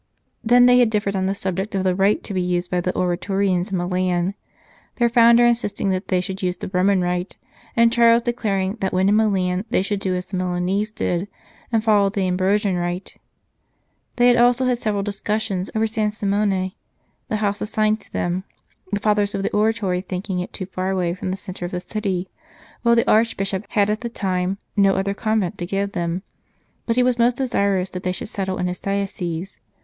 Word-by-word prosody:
Then 245 +2 +6
they 250 0 +6
had 245 -2 +4
differed 205 -2 -1
on 190 0 0
the 195 - -1
subject 190 +2 -3
of 190 - 0
the 185 -1 +2
rite 195 +3 +2
to 205 - -5
be 185 - 0
used 180 0 -1
by 180 -1 +1
the 180 - -1
Oratorians 185 +1 0
in 190 - 0
Milan, 180 +1 0 0.6
their 240 -1 +2
founder 235 0 +6
insisting 220 -4 0
that 185 +1 -2
they 185 - +1
should 190 +2 -4
use 180 -1 -1
the - - -6
Roman 185 +1 +3
Rite, 180 +1 -2 0.4
and 230 0 +4
Charles 235 -1 +5
declaring 205 -4 -1
that 190 - -1
when 185 +1 +3
in 205 - +4
Milan 190 -4 +1
they 225 - +1
should 200 0 -2
do 190 -2 -1
as 180 0 -3
the 190 - -5
Milanese 185 +3 -1
did, 180 -3 -2 0.4
and 225 -2 +1
follow 205 -3 +4
the 195 -2 -1
Ambrosian 190 +1 +1
Rite. 175 +2 -4 1.0
They 245 - +3
had 245 0 +6
also 245 +2 +4
had 250 -2 +1
several 210 -4 -1
discussions 205 -1 -2
over 220 0 +2
San 215 -1 0
Simone, 200 -2 0 0.6
the - - -2
house 205 -1 -1
assigned 215 0 0
to - - -21
them, 175 +2 -1 0.5
the 205 - 0
Fathers 210 -1 +1
of 195 - -2
the - - -1
Oratory 210 -4 +1
thinking 185 0 -4
it 180 - -4
too 185 - -5
far 185 0 -3
away 180 -3 0
from 185 +1 -5
the 190 - -2
centre 185 -2 -7
of 175 - -5
the 180 - -2
city; 190 -2 -3 0.5
while 235 0 +4
the 230 - +2
Archbishop 205 -3 +1
had 205 -2 +2
at 215 - -2
the 235 - -3
time 185 -3 -1 0.2
no 195 -2 +4
other 195 +1 0
convent 210 -2 -1
to 175 - -2
give 200 +1 -1
them, 175 0 -2 0.6
but 230 - +1
he 250 - +4
was 245 -1 +1
most 240 +1 +3
desirous 200 -7 0
that 180 - -5
they 185 - -1
should 185 - -5
settle 190 -2 -3
in 180 - -1
his 180 0 -3
diocese. 195 -3 -3
195 Hz, 205 wpm, -22 LUFS, 185-215 Hz, 1.0 s, Then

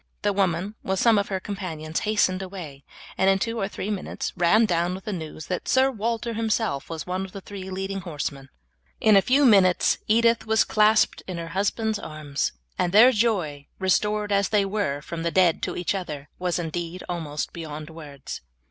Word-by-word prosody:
The 205 -1 +2
woman, 190 0 0
with 190 0 -1
some 230 -3 +5
of 200 - -1
her 190 -1 -2
companions, 165 -6 -4
hastened 210 -3 +1
away, 175 -8 -8 0.4
and 190 +1 +4
in 195 - +4
two 230 +3 -2
or 195 - 0
three 205 +1 -4
minutes 200 -3 -4
ran 185 +6 +4
down 175 -2 0
with 190 - -10
the 210 - -3
news 160 -3 -6
that 180 - -4
Sir 265 +1 +4
Walter 230 0 -2
himself 220 - -1
was 160 -2 -5
one 185 +1 -2
of 190 - -9
the 195 - -6
three 190 -1 -8
leading 195 +1 -3
horsemen. 145 -6 -5 0.5
In 215 -2 +5
a 195 - +7
few 270 +6 +3
minutes 195 -6 +5
Edith 230 +1 +3
was 220 0 +4
clasped 215 0 +3
in 185 -2 -4
her 165 -1 -5
husband's 205 +4 -1
arms, 150 -3 -3 0.3
and 175 - +1
their 225 +6 +8
joy, 185 - 0
restored 210 +2 +1
as 200 -1 +2
they 210 -2 +3
were 195 -8 -1
from 165 +1 -5
the 170 - 0
dead 175 -1 +3
to - - -3
each 180 - 0
other, 150 -7 -5
was 180 -1 0
indeed 175 +1 -4
almost 155 -4 -4
beyond 155 -1 -7
words. 145 -4 -8
190 Hz, 190 wpm, -25 LUFS, 165-210 Hz, 0.5 s, their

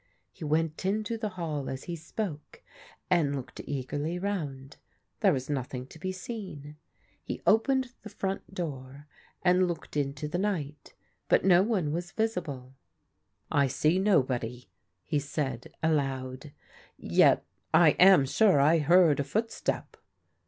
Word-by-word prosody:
He - - -11
went 155 +2 0
into 210 +4 -1
the 220 -1 -3
hall 150 -5 -3
as 130 0 -5
he 175 - -5
spoke 165 -1 -6 0.5
and 145 -4 +3
looked 130 -3 -7
eagerly 145 +5 -3
round. 150 -9 -4 0.4
There - - +4
was 130 -1 -2
nothing 130 -3 -3
to 160 - -13
be 185 +3 -3
seen. 185 -7 -7 0.5
He - - -5
opened 260 +3 +3
the 215 - -9
front 195 -1 -4
door 145 -6 -6 0.4
and 180 0 +4
looked 170 -3 -6
into 145 +1 -2
the 175 +4 -2
night, 155 -8 -3 0.3
but - - +4
no 180 -2 +6
one 190 -8 0
was 175 +3 -4
risible. 150 - -2 0.4
" - - -49 0.3
I 140 -3 +3
see 155 +7 +2
nobody," 125 - +1 0.4
he 150 - 0
said 135 -4 -4
aloud. 135 -3 -1 0.3
" - - -28
Yet - - +3 0.3
I 165 -3 +6
am 185 -6 +7
sure 190 +3 +4
I 155 +4 +5
heard 165 0 +5
a - - +2
footstep." 220 +11 -2
155 Hz, 145 wpm, -29 LUFS, 140-185 Hz, 0.5 s, am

